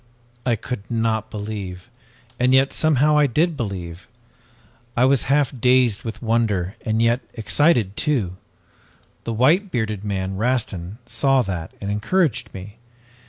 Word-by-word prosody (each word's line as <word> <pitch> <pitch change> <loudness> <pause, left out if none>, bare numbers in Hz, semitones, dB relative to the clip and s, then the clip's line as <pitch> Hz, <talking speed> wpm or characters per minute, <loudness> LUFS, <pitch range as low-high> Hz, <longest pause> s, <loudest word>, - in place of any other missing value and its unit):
"I 120 - +3
could 115 -1 -6
not 110 -2 -1
believe 100 -1 -6 0.5
and 125 +1 +4
yet 135 +1 +3
somehow 150 -1 +3
I 145 - +4
did 160 +6 +1
believe! 90 - -5 0.9
I 125 - +5
was 135 -1 +3
half 140 -1 +2
dazed 125 -3 +3
with 115 +1 -7
wonder 110 -5 0
and 110 +1 +1
yet 115 +1 +3 0.2
excited 110 - +2
too. 115 - 0 0.9
The 115 - -2
white 155 - +3
bearded 110 - -2
man, 95 -2 -3
Rastin, 110 -5 -2
saw 130 +2 +2
that, 90 -6 -5
and 100 0 -3
encouraged 135 - 0
me. 100 +3 -10
115 Hz, 135 wpm, -22 LUFS, 100-130 Hz, 0.9 s, I